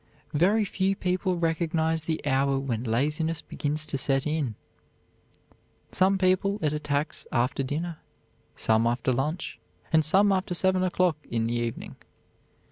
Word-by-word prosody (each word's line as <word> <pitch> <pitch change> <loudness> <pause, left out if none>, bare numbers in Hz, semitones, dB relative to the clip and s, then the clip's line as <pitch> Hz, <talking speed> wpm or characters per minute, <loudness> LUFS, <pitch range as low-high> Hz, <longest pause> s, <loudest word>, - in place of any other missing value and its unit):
Very 200 +8 +3
few 195 0 0
people 185 -1 -1
recognize 160 -1 0
the 160 -2 -2
hour 135 -1 +2
when 125 -4 -2
laziness 150 +7 0
begins 150 +1 -3
to 140 - -3
set 135 0 +2
in. 150 -7 -1 1.4
Some 190 +1 +3
people 190 +2 +2
it 150 -1 +1
attacks 145 0 -2
after 125 +3 +1
dinner; 155 +5 -3 0.6
some 110 +1 +2
after 120 +2 0
lunch; 150 +7 -3 0.3
and 160 -1 +5
some 195 +6 +4
after 185 -2 0
seven 190 +1 +2
o'clock 180 -3 +1
in 115 -1 0
the 115 - -1
evening. 120 -1 -4
155 Hz, 135 wpm, -27 LUFS, 135-180 Hz, 1.4 s, and